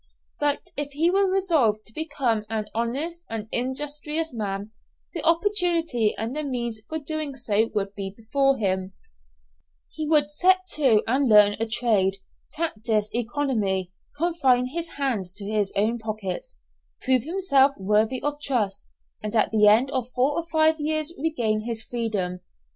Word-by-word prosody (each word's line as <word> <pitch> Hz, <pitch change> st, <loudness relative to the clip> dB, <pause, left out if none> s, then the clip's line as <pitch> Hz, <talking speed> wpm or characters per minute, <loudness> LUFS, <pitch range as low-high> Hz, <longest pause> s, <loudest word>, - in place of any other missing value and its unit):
But 295 Hz, +5 st, -1 dB
if 285 Hz, -1 st, -3 dB
he 325 Hz, +5 st, +2 dB
were 390 Hz, 0 st, +3 dB
resolved 305 Hz, -, +2 dB
to 220 Hz, -, -13 dB
become 265 Hz, -8 st, -1 dB
an 220 Hz, -1 st, -2 dB
honest 275 Hz, +10 st, -2 dB
and 220 Hz, -1 st, -4 dB
industrious 295 Hz, +5 st, -1 dB
man, 205 Hz, -2 st, -4 dB, 0.4 s
the 335 Hz, -, -3 dB
opportunity 335 Hz, -, +2 dB
and 225 Hz, +5 st, -3 dB
the 305 Hz, -, -1 dB
means 240 Hz, -6 st, -3 dB
for 315 Hz, -, -2 dB
so 310 Hz, -, -9 dB
doing 310 Hz, -1 st, -3 dB, 0.4 s
would 195 Hz, -1 st, -1 dB
be 195 Hz, -1 st, -4 dB
before 275 Hz, +4 st, +1 dB
him; 190 Hz, -2 st, -1 dB, 1.0 s
he 310 Hz, -1 st, -4 dB
would 295 Hz, -2 st, +3 dB
set 370 Hz, +4 st, +3 dB
to 260 Hz, -10 st, +3 dB
and 260 Hz, +2 st, +1 dB
learn 210 Hz, -1 st, +7 dB
a 225 Hz, -, 0 dB
trade, 210 Hz, -4 st, +1 dB, 0.3 s
practice 220 Hz, -9 st, -1 dB
economy, 225 Hz, -7 st, -1 dB, 0.3 s
confine 275 Hz, -7 st, +2 dB
his 335 Hz, +4 st, -3 dB
hands 240 Hz, -10 st, -2 dB
to 200 Hz, 0 st, -7 dB
his 210 Hz, -1 st, 0 dB
own 220 Hz, +4 st, +1 dB
pockets, 215 Hz, -, -5 dB, 0.5 s
prove 255 Hz, -1 st, +3 dB
himself 285 Hz, -4 st, +3 dB
worthy 215 Hz, +6 st, +1 dB
of 290 Hz, 0 st, -2 dB
trust, 230 Hz, -9 st, -1 dB, 0.4 s
and 215 Hz, +1 st, -4 dB
at 220 Hz, -, +3 dB
the 210 Hz, -1 st, +5 dB
end 235 Hz, +6 st, +5 dB
of 255 Hz, -3 st, -2 dB
four 260 Hz, +3 st, +3 dB
or 335 Hz, +3 st, -3 dB
five 315 Hz, 0 st, +3 dB
years 310 Hz, +1 st, 0 dB
regain 235 Hz, -9 st, 0 dB
his 230 Hz, -2 st, -2 dB
freedom. 210 Hz, -7 st, -3 dB
250 Hz, 155 wpm, -25 LUFS, 215-305 Hz, 1.0 s, learn